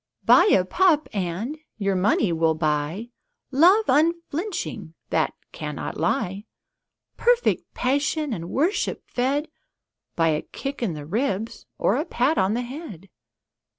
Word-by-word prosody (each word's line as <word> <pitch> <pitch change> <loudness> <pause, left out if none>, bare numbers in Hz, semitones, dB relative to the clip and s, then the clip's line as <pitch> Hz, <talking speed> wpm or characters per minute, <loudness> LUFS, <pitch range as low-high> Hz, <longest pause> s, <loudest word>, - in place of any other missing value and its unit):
Buy - - +7
a 190 - +4
pup 325 - +3
and 200 - -3 0.2
your 195 -2 0
money 185 -1 +2
will 160 -1 +2
buy 155 +8 -1 0.4
Love 360 +11 +5
unflinching 320 - -1 0.2
that - - +1 0.2
cannot - - -5
lie 200 -5 -1 0.7
Perfect 485 0 +2
passion 285 +2 0
and 170 -3 -5
worship 335 +9 0
fed 275 +5 -1 0.7
By 165 -1 +3
a 150 -1 +1
kick 275 -1 -6
in 195 -9 -1
the 145 -1 -7
ribs 215 - -2
or 220 - +2
a 300 - -1
pat 290 0 +1
on 190 +3 +2
the 245 - -1
head. 240 - -9
240 Hz, 130 wpm, -24 LUFS, 185-300 Hz, 0.7 s, Buy